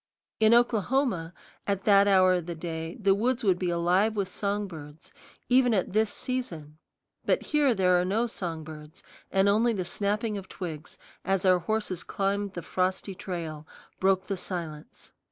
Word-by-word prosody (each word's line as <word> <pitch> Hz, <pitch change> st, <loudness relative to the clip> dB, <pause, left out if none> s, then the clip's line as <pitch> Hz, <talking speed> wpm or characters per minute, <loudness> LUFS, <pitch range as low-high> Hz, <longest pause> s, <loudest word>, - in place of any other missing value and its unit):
In 220 Hz, 0 st, +5 dB
Oklahoma, 240 Hz, -6 st, +1 dB, 0.4 s
at 200 Hz, -1 st, -1 dB
that 200 Hz, -1 st, +5 dB
hour 185 Hz, -2 st, +5 dB
of 175 Hz, -2 st, -2 dB
the 170 Hz, -, -4 dB
day, 165 Hz, 0 st, -5 dB
the 195 Hz, -2 st, +4 dB
woods 240 Hz, +5 st, 0 dB
would 185 Hz, -4 st, +2 dB
be 180 Hz, -, -1 dB
alive 180 Hz, +6 st, +2 dB
with 200 Hz, -3 st, -1 dB
song 205 Hz, +2 st, -2 dB
birds, 155 Hz, -3 st, -11 dB, 0.3 s
even 245 Hz, -2 st, +4 dB
at 185 Hz, -1 st, -1 dB
this 215 Hz, 0 st, +2 dB
season; 165 Hz, -, -5 dB, 0.4 s
but -, -, +1 dB
here 290 Hz, -5 st, +2 dB
there 180 Hz, -2 st, +3 dB
are -, -, 0 dB
no 210 Hz, +6 st, +1 dB
song 170 Hz, -8 st, -5 dB
birds, 155 Hz, +3 st, -11 dB, 0.3 s
and 195 Hz, +1 st, +3 dB
only 225 Hz, +4 st, +3 dB
the 185 Hz, -4 st, -3 dB
snapping 210 Hz, +3 st, -1 dB
of 190 Hz, -, -13 dB
twigs, 160 Hz, -5 st, -7 dB, 0.3 s
as 195 Hz, -1 st, 0 dB
our 185 Hz, -1 st, +5 dB
horses 190 Hz, -1 st, -2 dB
climbed 200 Hz, 0 st, -2 dB
the 175 Hz, -, -6 dB
frosty 185 Hz, +2 st, -1 dB
trail, 165 Hz, -5 st, -6 dB, 0.3 s
broke 190 Hz, 0 st, +2 dB
the 195 Hz, 0 st, -4 dB
silence. 170 Hz, -5 st, -7 dB
190 Hz, 170 wpm, -27 LUFS, 175-210 Hz, 0.4 s, In